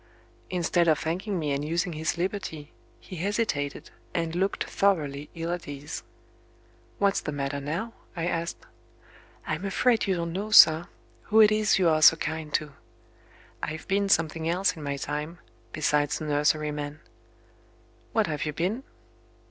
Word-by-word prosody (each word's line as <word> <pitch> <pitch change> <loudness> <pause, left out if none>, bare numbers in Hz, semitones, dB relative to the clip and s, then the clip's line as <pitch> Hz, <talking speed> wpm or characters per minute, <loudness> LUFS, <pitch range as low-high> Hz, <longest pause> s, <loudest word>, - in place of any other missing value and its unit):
Instead 175 -1 +1
of 155 -2 +4
thanking 185 +6 -2
me 150 -4 -1
and 140 +1 -1
using 170 +3 -1
his 160 +2 -2
liberty, 170 -5 -4 0.3
he 185 - -10
hesitated, 175 -7 -2 0.2
and 165 -1 -1
looked 195 +2 0
thoroughly 150 -7 0
ill 165 +1 -3
at 175 -1 -4
ease. 145 +2 -6 1.0
"What's 200 -1 +2
the 150 - -4
matter 140 0 -3
now?" 170 +11 -4 0.2
I 165 -1 -2
asked. 170 -1 -3 0.8
"I'm 155 +4 -3
afraid 220 +4 +2
you 190 - +2
don't 170 -1 -3
know, 200 +4 -3
sir, 165 -5 +8 0.4
who 220 - +3
it 215 -1 +8
is 215 -1 +3
you 185 -3 +3
are 155 -1 +3
so 160 - +9
kind 155 -1 -4
to. 150 -2 -1 0.9
I've 155 +1 -5
been 200 +1 +1
something 160 -2 +1
else 185 +2 +1
in 160 - -9
my 140 -1 -3
time, 150 +4 -4 0.3
besides 145 -1 +1
a - - -5
nurseryman." 150 0 0 1.1
"What 220 -2 +2
have 150 -4 -3
you 150 - -2
been?" 185 - -1
165 Hz, 155 wpm, -27 LUFS, 150-190 Hz, 1.1 s, so